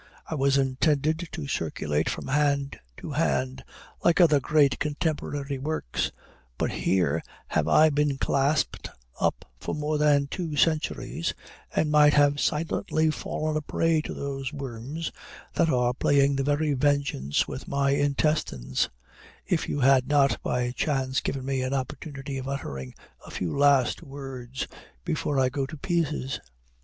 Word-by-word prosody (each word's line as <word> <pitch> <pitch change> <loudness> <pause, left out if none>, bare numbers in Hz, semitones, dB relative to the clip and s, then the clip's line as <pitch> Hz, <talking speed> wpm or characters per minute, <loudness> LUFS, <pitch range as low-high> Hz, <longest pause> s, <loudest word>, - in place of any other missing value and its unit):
I - - -5
was 140 -2 +2
intended 150 +4 +1
to 160 -4 -4
circulate 75 - -1
from - - -4
hand 140 -1 +1 0.2
to - - -7
hand, 130 -4 0 0.4
like 170 +1 +4
other 155 -5 +6
great 145 -1 +3
contemporary 145 -2 -2
works; 140 - -2 0.5
but - - 0
here 85 -4 +1 0.3
have - - +1
I 155 0 +6
been 145 -1 +1
clasped 140 +2 0 0.3
up - - 0
for - - -3
more 150 0 -1
than 145 -2 +4
two 160 +1 -4
centuries, 160 +2 0 0.4
and 150 - +2
might 150 -1 +6
have 145 0 +4
silently 155 +1 +1
fallen 155 0 -3
a 155 - 0
prey 160 +1 +1
to - - -6
these 135 -1 -4
worms 140 +3 -5 0.4
that 165 - +2
are 125 -3 +2
playing 140 +2 +3
the 135 - 0
very 145 +1 +1
vengeance 140 - +1
with - - -7
my 140 0 +1
intestines, 140 - 0 0.6
if - - 0
you 145 - -1
had 130 -1 +5
not 145 -2 +3
by 125 0 -1
chance 130 -1 0
given 135 -1 -3
me 135 -1 -1
an 130 +2 -1
opportunity 135 +1 -4
of 130 - -6
uttering 70 - -5 0.3
a - - -12
few 90 - -3
last 140 -3 +4
words 135 -2 -6 0.4
before 140 -2 0
I 130 -1 +3
go 135 0 -2
to 155 - -8
pieces." 150 -5 -1
140 Hz, 150 wpm, -27 LUFS, 130-150 Hz, 0.6 s, other